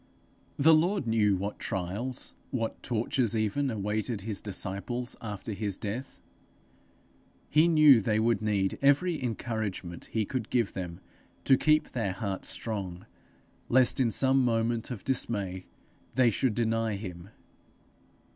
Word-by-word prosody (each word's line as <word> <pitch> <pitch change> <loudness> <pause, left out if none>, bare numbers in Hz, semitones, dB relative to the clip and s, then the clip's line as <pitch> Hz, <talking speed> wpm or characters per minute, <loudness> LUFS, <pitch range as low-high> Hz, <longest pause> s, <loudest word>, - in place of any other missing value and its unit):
The 160 +3 +6
Lord 170 +1 +2
knew 110 -3 +3
what 100 +3 -4
trials, 100 +8 -3 0.2
what 115 -4 -3
tortures 120 0 0
even 110 +6 0
awaited 110 0 -2
his 105 0 -3
disciples 105 +5 -4
after 105 -1 -5
his 100 -2 -3
death; 115 +5 -5 1.3
he 155 +3 +5
knew 155 -7 +7
they 105 +1 +1
would 115 -2 +2
need 100 -3 0
every 145 +3 +3
encouragement 110 -7 -4
he 110 -2 -1
could 125 0 -4
give 120 -5 +1
them 90 -1 -6 0.4
to 135 - +5
keep 155 +3 +2
their 110 -6 -1
hearts 95 -1 -3
strong, 95 -5 -3 0.6
lest 130 +1 +4
in 125 -3 +3
some 130 +3 +3
moment 115 -1 0
of 120 -7 -6
dismay 100 -8 -1 0.5
they 125 -2 +4
should 115 +2 0
deny 115 -2 0
him. 95 -2 -8
115 Hz, 130 wpm, -29 LUFS, 100-130 Hz, 1.3 s, knew